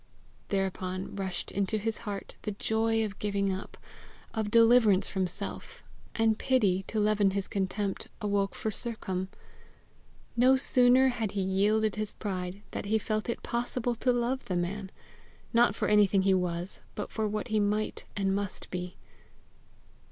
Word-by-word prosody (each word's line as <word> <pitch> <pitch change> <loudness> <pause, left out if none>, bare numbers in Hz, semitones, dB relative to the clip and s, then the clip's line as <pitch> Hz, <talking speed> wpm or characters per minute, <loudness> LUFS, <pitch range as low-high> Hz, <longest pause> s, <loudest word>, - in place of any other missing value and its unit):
Thereupon 190 -1 -2
rushed 190 -2 -3
into 200 +2 0
his 220 +1 -2
heart 200 -1 -5
the 210 - -3
joy 225 +2 +1
of 205 -1 -7
giving 200 -1 0
up, 190 - -7 0.6
of 220 -2 -1
deliverance 230 -3 +5
from 190 -2 0
self; - - -7 0.3
and 225 -1 +2
pity, 200 -8 +2
to 220 - -1
leaven 210 -1 +3
his 195 - -2
contempt, 195 0 -2
awoke 200 -1 0
for 220 - -2
Sercombe. 190 -5 -3 1.1
No 255 +2 +5
sooner 255 0 +5
had 225 -5 -2
he 200 - 0
yielded 210 +3 +2
his 215 -1 -3
pride, 185 0 -4
than - - -4
he 220 +2 +2
felt 215 +1 -2
it 235 - -3
possible 245 0 -1
to 250 - +2
love 245 +2 0
the 185 - -2
man 190 +3 -3 0.6
not 235 -3 +4
for - - -1
anything 205 -2 +4
he 195 0 +4
was, 180 0 -1 0.2
but - - -4
for 220 -1 -1
what 210 +3 -3
he 215 -1 +2
might 210 +1 0
and 195 -1 +1
must 200 -1 -3
be. 180 0 -5
205 Hz, 155 wpm, -29 LUFS, 195-225 Hz, 1.1 s, deliverance